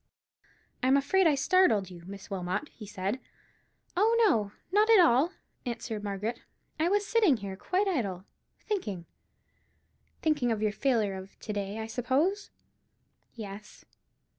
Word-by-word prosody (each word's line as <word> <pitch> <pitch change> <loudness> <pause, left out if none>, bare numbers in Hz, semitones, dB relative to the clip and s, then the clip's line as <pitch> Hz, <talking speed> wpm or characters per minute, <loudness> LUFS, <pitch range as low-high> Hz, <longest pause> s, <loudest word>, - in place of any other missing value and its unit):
"I 255 - +1
am 270 +2 +5
afraid 355 +7 +3
I 300 - +4
startled 275 - +3
you, 175 -1 -10
Miss 195 0 -9
Wilmot," 185 +8 -3
he 210 - -11
said. 195 +4 -3 0.8
"Oh, 440 +5 +3
no; 215 - +1 0.2
not 420 +3 +4
at 445 -3 +8
all," 320 -1 +5 0.3
answered 230 -3 -4
Margaret; 210 +4 -3 0.4
"I 325 +2 +2
was 410 +1 +2
sitting 415 - +3
here, 195 -2 -6
quite 370 - 0
idle, 200 - -2 0.4
thinking——" 210 - -3 1.2
"Thinking 295 -7 +2
of 220 - 0
your 215 -1 +1
failure 220 -4 +1
of 190 0 -9
to 215 - -4
day, 200 0 -3
I 220 - -3
suppose?" 270 - 0 0.9
"Yes." 210 -2 -9
235 Hz, 140 wpm, -29 LUFS, -, 1.2 s, at